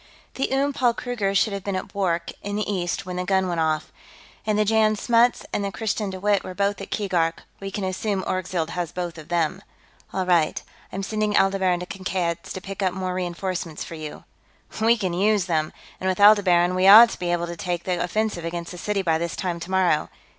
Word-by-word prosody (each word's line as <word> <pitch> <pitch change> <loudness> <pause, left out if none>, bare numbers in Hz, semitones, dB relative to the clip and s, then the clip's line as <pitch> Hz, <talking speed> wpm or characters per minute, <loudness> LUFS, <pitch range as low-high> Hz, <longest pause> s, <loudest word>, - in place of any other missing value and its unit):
The 270 - -2
Oom 280 +1 +1
Paul 245 -3 +2
Kruger 215 -6 -2
should 205 +1 +2
have 200 -1 -4
been 200 -1 -2
at 185 - -4
Bwork, 175 -4 -1
in 205 0 -4
the 210 - -2
east, 180 -5 -2
when 180 -1 -5
the 180 - -1
gun 190 0 +1
went 170 -2 -2
off. 155 -1 0 0.6
And 210 -1 +2
the 215 - +3
Jan 215 0 +3
Smuts 235 +3 +2
and 205 - 0
the 200 - -2
Christiaan 215 -1 -2
De 190 -1 -6
Wett 205 0 +2
were 185 - -7
both 200 0 0
at 195 - -7
Keegark; 175 -5 -1 0.2
we 195 - -5
can 195 +1 -4
assume 190 +1 -2
Orgzild 185 -3 -2
has 175 -3 -3
both 175 -2 -5
of 155 - -11
them." 170 -3 0 0.5
"All 190 -1 -1
right. 170 -4 +2 0.3
I'm 195 - -4
sending 210 0 0
Aldebaran 190 -2 +2
to - - -4
Kankad's, 180 -3 -3
to - - -5
pick 195 +2 -7
up 185 -2 0
more 185 -1 -2
reenforcements 180 -2 -3
for - - -9
you." 155 -2 -8 0.6
"We 230 +2 +4
can 185 -5 -2
use 200 +1 +2
them! 155 -3 0 0.3
And 190 - -1
with 185 - -1
Aldebaran, 190 -4 +5
we 185 +1 +3
ought 225 +4 +10
to - - -7
be 175 -1 -1
able 175 0 0
to 170 0 -6
take 175 0 -3
the 180 -2 -1
offensive 210 -1 -1
against 170 0 -4
the 180 - -8
city 205 0 -1
by 160 -3 +1
this 170 0 -3
time 175 -2 -3
tomorrow. 180 -2 +1
185 Hz, 220 wpm, -24 LUFS, 175-205 Hz, 0.6 s, ought